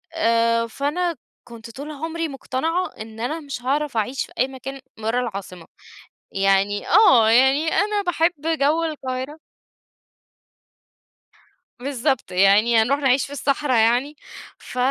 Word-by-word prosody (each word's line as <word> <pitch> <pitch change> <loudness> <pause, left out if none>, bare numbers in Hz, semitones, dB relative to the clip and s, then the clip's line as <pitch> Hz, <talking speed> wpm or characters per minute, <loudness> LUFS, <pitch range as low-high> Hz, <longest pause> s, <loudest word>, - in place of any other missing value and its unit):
آآ، 230 -5 +2
فأنا 315 +8 -2 0.3
كنت 230 -1 -11
طول 285 +5 -8
عمري 325 +3 -4
مقتنعة 315 +6 -2
إن 220 0 -9
أنا 300 +8 -3
مش 280 -5 -7
هاعرف 280 0 -1
أعيش 245 +5 -1
في - - -22
أي 255 - +3
مكان 270 +1 -8 0.2
برّا 225 +3 -1
العاصمة 195 -6 -7 0.7
يعني 195 +1 +1
آه، 240 - +6
يعني 265 +6 +4
أنا 415 +1 +1
باحب 350 -2 +1 0.3
جوّ 310 +4 +2
القاهرة 275 -2 -5 2.4
بالضبط، 265 -2 -2
يعني 205 +5 +4
هنروح 275 +6 +1
نعيش 265 -1 +2
في 280 - -12
الصحرا 280 -1 0
يعني؟ 240 +6 +2 0.4
ف - - -11
260 Hz, 125 wpm, -22 LUFS, 230-300 Hz, 2.4 s, آه